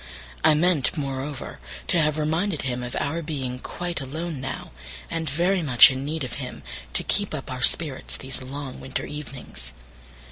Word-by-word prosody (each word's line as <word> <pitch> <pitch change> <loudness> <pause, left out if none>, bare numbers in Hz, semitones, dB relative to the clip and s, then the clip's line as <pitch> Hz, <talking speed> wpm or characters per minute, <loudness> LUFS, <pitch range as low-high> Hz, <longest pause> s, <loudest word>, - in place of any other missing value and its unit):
I 155 -1 +7
meant, 160 -2 +3
moreover, 135 0 -3 0.3
to - - +4
have 155 0 +2
reminded 160 +3 +1
him 125 -2 -1
of 125 0 -4
our 160 +4 0
being 135 -6 -3
quite 175 +3 -3
alone 155 +2 -4
now, 135 0 -4 0.4
and 165 -2 -1
very 175 +6 +2
much 135 -4 +9
in 130 +1 -3
need 155 +1 -2
of 125 - -4
him 125 - -6 0.3
to - - +1
keep 205 -5 +2
up 135 -2 -5
our 125 0 -4
spirits 145 0 +1
these 130 0 -3
long 135 +1 -6
winter 130 0 -3
evenings. 130 - -6
145 Hz, 170 wpm, -26 LUFS, 130-160 Hz, 0.4 s, much